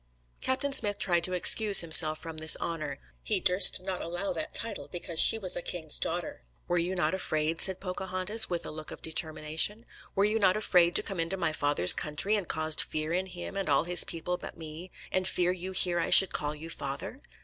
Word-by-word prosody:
Captain 275 +2 -2
Smith 205 -5 0
tried 175 -2 0
to 185 - -3
excuse 205 +3 +4
himself 155 -1 +3
from 160 -1 -9
this 160 0 +3
honour. 165 -3 -5 0.2
He - - -1
"durst 180 0 +5
not 185 -1 -5
allow 175 +3 -4
that 160 -2 -4
title 225 -3 0
because 170 -2 -2
she - - +9
was 190 -4 0
a - - -3
king's 160 -3 -1
daughter." 175 - -4 0.3
"Were 175 - -1
you 175 +2 -3
not 180 - -1
afraid," 160 -3 -3
said 190 -1 +1
Pocahontas, 190 +3 0
with 175 -2 -4
a - - -7
look 155 0 -9
of - - -11
determination, 160 +6 -2 0.3
"were 195 - +1
you 215 +2 -1
not 190 -1 +2
afraid 180 -5 +2
to - - +2
come 195 -3 -6
into 165 +3 -2
my 160 -4 -2
father's 145 - +3
country, 155 +8 -1
and 200 -5 -4
caused 155 0 0
fear 155 +1 -4
in 185 +2 -2
him 180 +1 -9
and 195 -4 -4
all 140 +1 +2
his 175 0 +4
people 180 +2 -5
but - - -11
me, 160 +2 -10 0.2
and 185 0 -1
fear 180 -1 -1
you 185 +1 -6
here 180 -2 0
I - - -2
should 195 - +7
call 150 0 -3
you 160 +2 -9
father? 140 - -7
175 Hz, 215 wpm, -28 LUFS, 160-190 Hz, 0.3 s, she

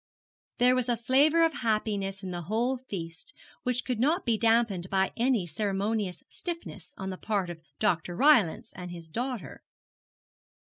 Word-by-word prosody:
There 250 0 +5
was 255 -1 0
a 240 - +2
flavour 285 +8 +4
of 325 - 0
happiness 205 -3 -1
in 185 - -4
the 175 -1 -4
whole 240 +4 +1
feast 190 - -7 0.3
which 250 0 -1
could 250 -4 -2
not 310 +9 +2
be 230 -2 +3
damped 225 -5 +2
by 190 -1 +2
any 240 -5 +2
ceremonious 200 +1 -2
stiffness 330 - -7
on 190 0 -4
the 185 - -7
part 200 -5 -1
of 165 -1 -10 0.2
Dr. 175 +1 0
Rylance 240 - +4
and 180 0 -7
his 170 -2 -8
daughter. 230 - -4
215 Hz, 160 wpm, -29 LUFS, 185-250 Hz, 0.3 s, There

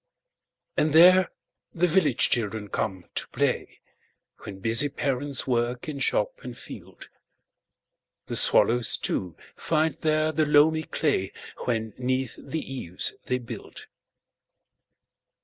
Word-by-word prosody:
And 150 -1 +1
there 180 +3 +7 0.5
the 175 +1 +2
village 160 -7 +2
children 110 -3 -2
come 95 -5 -3
to - - -3
play, - - -2 0.6
When 100 - -9
busy 115 +8 +2
parents 140 0 -1
work 120 +1 -1
in 145 -2 -5
shop 105 -5 0
and 125 -1 -9
field. - - -11 1.2
The - - -5
swallows, 120 0 +5
too, 90 -4 -3 0.2
find 160 -1 0
there 155 +1 0
the 155 0 0
loamy 155 +2 +4
clayWhen 110 -3 -3
'neath 130 0 -2
the 160 - -4
eaves 90 -9 -2
they 125 - 0
build. 120 -2 -10
130 Hz, 115 wpm, -25 LUFS, 115-155 Hz, 1.2 s, there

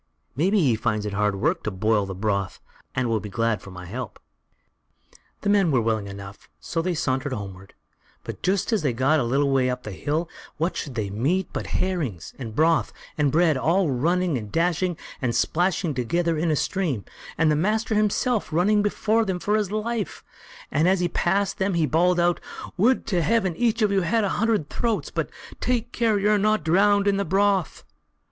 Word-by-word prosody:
Maybe 190 +9 +2
he 130 -8 +3
finds 110 -1 -1
it 105 - -3
hard 105 0 +1
work 165 - 0
to - - -2
boil 105 +1 +1
the 95 - -5
broth, 100 -1 -2 0.4
and 130 -1 0
will 115 -1 +1
be 105 - -7
glad 115 +2 0
of - - -9
my 90 0 -9
help." 120 +4 -6 1.2
The 205 - -1
men 200 -4 +4
were 135 -4 +3
willing 110 -2 0
enough, 100 0 -10
so 165 - -2
they 180 +1 -1
sauntered 130 -2 -1
homeward; 95 -3 -8 0.5
but - - -7
just 195 +4 0
as 220 - +2
they 145 - +1
had 115 - -4
got 140 +5 +3
a - - +1
little 135 +4 +1
way 130 -1 +2
up 125 0 -3
the 105 - -6
hill, 150 - -2 0.3
what 165 +4 -1
should 135 -4 -5
they 105 -4 -2
meet 155 - -1
but - - -4
herrings, 150 - -2
and 115 -4 -6
broth, 160 +3 +3 0.2
and 145 -2 +1
bread, 160 -1 +3
all 165 +3 +2
running 165 +3 +1
and 105 -2 -9
dashing, 175 +1 0 0.2
and 120 -3 0
splashing 175 -1 +1
together 165 +7 0
in 165 +2 0
a 155 - +2
stream, 150 - -1 0.3
and 160 -1 +3
the - - +3
master 215 +8 0
himself 215 +2 +1
running 200 +6 +3
before 215 +2 +1
them 190 -4 -2
for 205 +4 0
his 210 -3 0
life, 215 0 -3 0.5
and 155 +5 +2
as 190 0 +2
he 175 -1 0
passed 195 +3 0
them 190 -1 0
he 165 -2 +2
bawled 175 +4 +2
out: 175 0 +2 0.4
"Would 235 +7 +2
to 180 -5 0
heaven 190 -1 +1
each 230 +2 +1
of 210 - +2
you 195 -1 +2
had 215 +6 +1
a 200 - +1
hundred 215 -8 0
throats! 230 +4 -2
but - - -2 0.3
take 240 -1 -1
care 225 -3 +1
you're 210 +1 +3
not 215 -3 +2
drowned 200 +5 +3
in 200 -1 +3
the 200 - +1
broth." 195 0 +1
165 Hz, 200 wpm, -24 LUFS, 125-200 Hz, 1.2 s, men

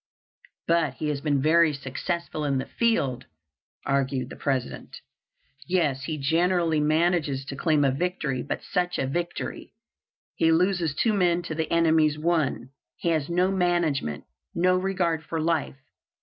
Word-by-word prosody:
"But 165 -5 +2
he 155 - -3
has 145 -2 -2
been 145 -3 +1
very 160 0 +4
successful 150 +4 -4
in 140 -2 0
the 130 - -2
field," 180 - 0 0.6
argued 135 -2 -1
the - - -7
President. 135 -3 -3 0.7
"Yes, 150 -7 0
he 155 0 -3
generally 165 +2 +2
manages 155 -3 +1
to 135 - -6
claim 150 -1 +2
a 135 - +3
victory, 150 -3 -2
but - - -4
such 180 -1 -1
a - - 0
victory! 175 +9 -4 0.6
He 165 - +2
loses 175 -2 +1
two 220 +7 +2
men 175 -3 +2
to 160 - -5
the 160 0 -2
enemy's 160 -2 +3
one. 155 -6 0 0.3
He 170 - -1
has 155 -3 0
no 180 +2 +2
management, 175 - 0 0.3
no 180 +2 +3
regard 185 -4 0
for 160 +1 -4
life. 160 -4 -1
160 Hz, 150 wpm, -26 LUFS, 140-175 Hz, 0.7 s, very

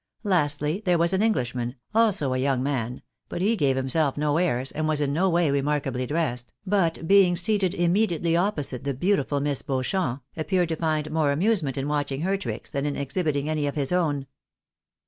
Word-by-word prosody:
Lastly, 150 -2 +1
there 180 -3 +2
was 170 +2 +2
an 190 - +2
Englishman, 125 - -1 0.2
also 205 - +2
a - - 0
young 130 -1 +1
man; 125 -3 -2 0.3
but - - -4
he 210 +5 +2
gave 140 -9 +2
himself 135 +2 0
no 150 0 +1
airs, 135 -7 0
and 155 0 -2
was 155 -1 +2
in 140 -1 0
no 185 +5 +2
way 170 -3 +2
remarkably 140 -3 -1
dressed; 125 -6 -2
but 175 -5 0
being 195 -2 +5
seated 190 +1 +1
immediately 175 -2 +1
opposite 160 - -1
the 140 -1 -2
beautiful 145 -2 +1
Miss 140 -1 0
Beauchamp, 135 0 -2
appeared 165 +2 0
to 165 - -1
find 155 -1 -1
more 155 -2 +2
amusement 160 - +1
in 135 - -2
■watching 145 -1 -2
her 190 +2 +1
tricks, 195 - -6
than 140 -1 -1
in 145 - -2
exhibiting 140 0 -1
any 155 -2 0
of 140 - -3
his 140 -1 -1
own. 150 -6 0
150 Hz, 185 wpm, -25 LUFS, 140-180 Hz, 0.3 s, being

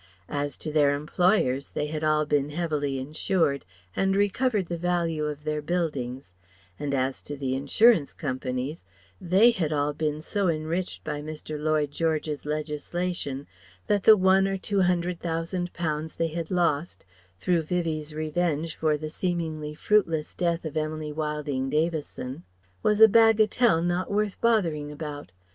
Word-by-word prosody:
As 145 -1 -2
to 155 - -5
their 145 -2 +4
employers, 150 -3 +1
they 150 - 0
had 155 +1 -4
all 155 0 +3
been 145 -1 +1
heavily 150 -4 -1
insured, 150 +2 0 0.3
and 195 0 +2
recovered 205 +1 +1
the 170 0 -4
value 170 -3 0
of 150 -1 -4
their 150 0 -2
buildings; 140 - -3 0.5
and 145 -1 -2
as 130 0 -1
to 145 - -7
the 135 -2 -2
insurance 145 - +4
companies 130 +1 -4 0.4
they 190 +7 +5
had 165 -9 -1
all 145 0 0
been 150 0 -2
so 200 +5 -1
enriched 165 +3 -2
by 150 -1 -4
Mr. 155 0 -7
Lloyd 155 -2 +1
George's 155 -1 -1
legislation 150 -1 -3 0.4
that 205 -2 +2
the 215 +2 +8
one 190 +1 +4
or 195 0 -1
two 195 +1 0
hundred 180 -1 +1
thousand 170 +2 -2
pounds 155 -2 -3
they 165 0 0
had 165 0 -4
lost, 170 -3 0 0.3
through 170 - +1
Vivie's 155 -2 -2
revenge 155 0 -1
for 155 -2 +1
the 155 +1 -6
seemingly 160 -4 -3
fruitless 165 -5 +1
death 170 -2 -1
of 155 -1 -5
Emily 155 0 -2
Wilding 150 -3 -2
Davison, 155 -2 -2 0.4
was 210 +1 +2
a 220 - +12
bagatelle 220 -3 +4
not 175 +1 0
worth 205 -1 -1
bothering 165 -11 +1
about. 150 -1 -7
155 Hz, 150 wpm, -26 LUFS, 150-180 Hz, 0.5 s, a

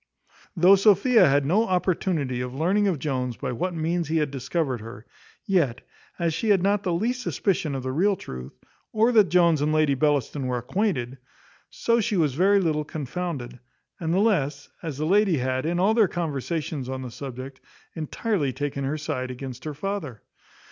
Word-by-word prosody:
Though 185 +4 +7
Sophia 210 - +5
had 140 0 +2
no 205 +10 +2
opportunity 175 -8 0
of 125 0 -5
learning 190 +8 +2
of 185 -5 +1
Jones 130 -4 -2
by - - -3
what 175 +9 -2
means 165 +1 -1
he 160 +1 0
had 150 -3 0
discovered 135 -2 -2
her, 115 +1 -10 0.4
yet, 150 -11 +1 0.4
as 170 -2 0
she 215 +7 -2
had 195 -3 +4
not 200 +1 +2
the 185 - -2
least 235 +9 -1
suspicion 175 - -1
of 130 - -4
the 130 - -2
real 195 +8 +2
truth, 65 - -9 0.3
or 225 +3 +3
that 215 -6 +5
Jones 170 -4 +4
and 150 +1 +1
Lady 155 -2 +3
Bellaston 145 -1 0
were 125 -1 -1
acquainted, 130 - -2 0.5
so 235 0 +1
she 210 -2 0
was 150 -6 +2
very 195 +7 +4
little 155 -5 0
confounded; 145 -4 -5 0.4
and 165 -1 -2
the 175 - +2
less, 150 -9 +1
as 160 -5 -5
the 155 - -2
lady 195 -1 +3
had, 130 +3 -1
in 175 +1 0
all 200 +4 +3
their 220 -3 +4
conversations 155 -4 -3
on 130 0 -4
the 125 - -7
subject, 130 +1 -8 0.3
entirely 160 - -1
taken 140 0 -3
her 140 +3 -1
side 130 -4 -3
against 130 +1 -7
her 150 -2 -4
father. 155 - -5
155 Hz, 180 wpm, -25 LUFS, 135-190 Hz, 0.5 s, Though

